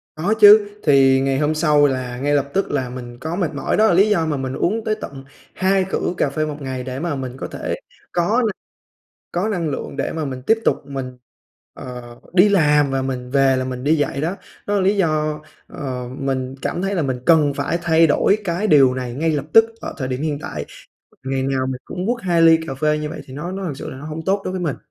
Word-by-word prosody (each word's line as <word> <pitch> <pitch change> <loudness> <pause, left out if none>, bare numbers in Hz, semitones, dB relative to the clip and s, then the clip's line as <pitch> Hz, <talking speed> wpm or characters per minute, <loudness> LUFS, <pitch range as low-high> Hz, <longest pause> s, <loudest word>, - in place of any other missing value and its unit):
Có 175 +7 0
chứ, 205 0 +8
thì 135 -2 +5
ngày 135 0 0
hôm 150 +1 +1
sau 150 -2 +4
là 130 -2 -3
ngay 145 +3 0
lập 140 -1 +1
tức 195 - 0
là 130 -3 -1
mình 120 -1 -8
có 160 +5 -4
mệt 175 -5 -1
mỏi, 145 - -1
đó 220 +1 +5
là - - +3
lý 195 +5 +4
do 170 -6 +2
mà 150 -3 -1
mình 130 -1 -3
uống 220 +10 -1
tới 215 0 0
tận 135 -1 -8 0.3
2 190 0 +1
cữ 180 - -1
cà - - +1
phê 155 +2 -1
một 150 -1 -5
ngày, 130 -2 -4
để 130 +1 -5
mà 165 -1 -2
mình 130 -1 -6
có - - -5
thể - - -4 0.4
có 205 +8 +1
na - - 0 0.8
có 180 +5 0
năng 175 -7 -1
lượng 140 - -5
để - - -2
mà 160 -1 -3
mình 130 -2 -5
tiếp 225 - +4
tục - - +1
mình, 130 -2 -6 0.6
ờ, 125 -1 -9 0.2
đi 185 +3 +6
làm 150 -7 +3
và 135 0 -1
mình 125 -1 -4
về 135 -1 +3
là 130 - -1
mình 125 0 -5
đi 155 +3 +3
dạy 145 -2 -1
đó. 170 +6 -2 0.3
Đó 205 - 0
là 200 - +2
lý 195 +2 +2
do, 155 -4 0 0.3
ờ, 125 -3 -5
mình 130 -1 -2
cảm 175 - -2
thấy 195 +1 -1
là 175 - 0
mình 130 -3 -2
cần 155 -4 +5
phải 170 - -1
thay 165 -1 +4
đổi 195 +7 +3
cái 180 +3 -1
điều 135 -8 +5
này 125 -2 -4
ngay 160 +5 0
lập 145 -2 -1
tức 225 - +8 0.2
ở - - -6
thời 130 -3 -3
điểm 130 +2 -3
hiện 150 -2 -1
tại, - - -5 0.6
ngày 135 0 -1
nào 135 -1 0
mình 130 -1 -4
cũng 180 +2 -5
quất 240 0 -1
2 170 -2 +2
ly 165 0 +7
cà 135 - -4
phê 150 +2 +1
như 150 0 -3
vậy 160 - -7
thì 130 - -12
nó 170 +6 -5
nó 195 0 -5
thực 155 -7 -4
sự - - -7
là - - -8
nó 135 - -10
hông 155 +1 -5
tốt 195 +3 +1
đối 185 - -3
với 185 - -3
mình. 160 -6 -2
150 Hz, 255 wpm, -20 LUFS, 135-175 Hz, 0.8 s, chứ